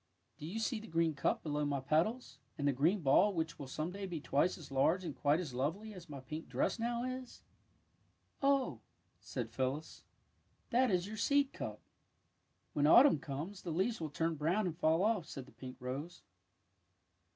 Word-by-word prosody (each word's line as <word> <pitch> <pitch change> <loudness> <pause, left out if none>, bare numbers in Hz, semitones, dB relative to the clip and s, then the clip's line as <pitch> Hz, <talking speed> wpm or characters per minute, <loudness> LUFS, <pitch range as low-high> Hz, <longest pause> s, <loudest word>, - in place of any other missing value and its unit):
Do 150 - -6
you 190 +7 -4
see 225 +1 -1
the 220 - -10
green 165 -1 +1
cup 140 - 0
below 150 -1 -1
my 145 -1 0
petals, 165 - 0 0.2
and 145 - 0
the 140 - +3
green 165 +10 +2
ball 160 +8 +5
which 160 0 -2
will 140 - -6
some 155 +6 -3
day 195 +1 -5
be 170 -3 -4
twice 145 +5 +1
as 155 -5 -11
large 160 +7 +3
and 160 -6 -4
quite 145 +4 +2
as 160 -8 -4
lovely 165 - -2
as 175 -4 -11
my 140 -2 -6
pink 155 +5 -7
dress - - 0
now 235 +1 -1
is? 255 0 -6 0.5
" - - -40
Oh," 275 - +2 0.4
said 115 -3 -5
Phyllis, 130 +5 -3 0.6
'^ - - -40
that 250 +1 +4
is 180 -3 +1
your 215 +2 -6
seed 280 +4 +2
cup." - - -5
^^ - - -31 0.9
When 145 0 +3
autumn 245 - +8
comes 155 +9 -5
the 175 - -6
leaves 190 +6 0
will 155 - -2
turn 165 +3 0
brown 165 +7 +1
and 170 -3 -2
fall 160 +2 +3
off," 210 -6 +1
said 135 -3 -7
the 135 - -17
pink 130 -1 -9
rose. 135 +7 -5
165 Hz, 195 wpm, -35 LUFS, 145-205 Hz, 0.9 s, autumn